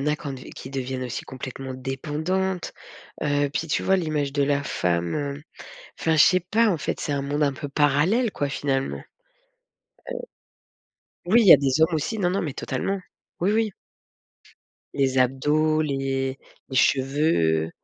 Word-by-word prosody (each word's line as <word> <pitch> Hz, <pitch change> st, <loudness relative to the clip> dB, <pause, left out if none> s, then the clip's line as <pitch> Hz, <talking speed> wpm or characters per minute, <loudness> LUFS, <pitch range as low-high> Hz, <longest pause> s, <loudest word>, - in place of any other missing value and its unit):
en -, -, -3 dB
a 150 Hz, 0 st, +2 dB
qu'en 145 Hz, -4 st, -6 dB
dev 130 Hz, -1 st, -9 dB
qui 130 Hz, -, -9 dB
deviennent 130 Hz, -1 st, -3 dB
aussi 125 Hz, -, -5 dB
complètement 130 Hz, 0 st, -7 dB
dépendantes, 160 Hz, +8 st, -2 dB, 0.5 s
heu, 145 Hz, -1 st, +1 dB
puis 160 Hz, +3 st, -3 dB
tu -, -, 0 dB
vois 190 Hz, -, +3 dB
l'image 150 Hz, -5 st, -1 dB
de 145 Hz, -1 st, +2 dB
la 145 Hz, 0 st, +1 dB
femme, 85 Hz, -7 st, -1 dB
hem 145 Hz, 0 st, -3 dB, 0.6 s
enfin, 160 Hz, -1 st, +2 dB
je 150 Hz, -, +8 dB
sais 185 Hz, -1 st, +4 dB
pas, 220 Hz, +6 st, +2 dB
en 175 Hz, -6 st, +1 dB
fait, -, -, -3 dB
c'est 145 Hz, -, -2 dB
un 140 Hz, -, -1 dB
monde 145 Hz, +2 st, -1 dB
un 140 Hz, -, +1 dB
peu 145 Hz, +2 st, -6 dB
parallèle, 150 Hz, -, +2 dB
quoi, 145 Hz, -, -2 dB
finalement, 135 Hz, -1 st, -1 dB
heu -, -, -11 dB, 2.2 s
oui, 225 Hz, +7 st, +5 dB
il 210 Hz, -, +3 dB
y -, -, +12 dB
a -, -, +9 dB
des 140 Hz, +2 st, +1 dB
hommes 160 Hz, +1 st, +4 dB
aussi 185 Hz, +9 st, -2 dB
non, 180 Hz, -3 st, +1 dB
non, 195 Hz, -, 0 dB
mais 150 Hz, -5 st, -3 dB
totalement. 195 Hz, +12 st, -2 dB, 0.4 s
Oui, 190 Hz, +4 st, +2 dB
oui. 220 Hz, -2 st, +1 dB, 1.2 s
Les 135 Hz, -1 st, +1 dB
abdos, 150 Hz, +5 st, +2 dB
les 135 Hz, -2 st, -2 dB, 0.3 s
les 130 Hz, -, -4 dB
cheveux. 130 Hz, -, +2 dB
145 Hz, 170 wpm, -24 LUFS, 135-160 Hz, 2.2 s, y